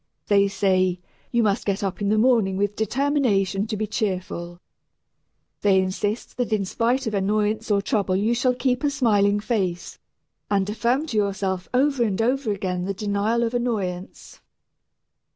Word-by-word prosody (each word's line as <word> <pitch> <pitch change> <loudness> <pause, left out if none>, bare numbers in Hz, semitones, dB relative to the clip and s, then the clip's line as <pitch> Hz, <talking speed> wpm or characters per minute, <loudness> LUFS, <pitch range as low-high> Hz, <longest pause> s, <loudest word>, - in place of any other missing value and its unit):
They 200 -1 +5
say, 185 -2 +1 0.3
"You 235 -1 +2
must 205 0 +1
get 200 0 -1
up 195 +1 -3
in 200 - 0
the 215 - +2
morning 220 -5 +3
with 205 +1 0
determination 220 -5 +1
to 215 - -3
be 215 - -1
cheerful." 185 -5 -3 1.0
They 195 -2 +4
insist 205 +5 -2
that 245 -2 -1
in 210 -3 +1
spite 245 +7 0
of 220 - -2
annoyance 210 +2 0
or 200 -1 +2
trouble 200 -4 0
you 210 +5 +1
shall 250 +1 +1
keep 250 +1 0
a 290 - +3
smiling 205 -7 +2
face, 195 -6 -2 0.5
and 195 -1 +1
affirm 240 +7 0
to 235 -9 -3
yourself 195 -2 -1
over 270 +1 +2
and 205 -3 -1
over 250 0 +1
again 185 -3 -2
the 195 +1 -3
denial 210 +3 0
of 230 0 -1
annoyance. 200 -7 -3
210 Hz, 160 wpm, -23 LUFS, 195-235 Hz, 1.0 s, They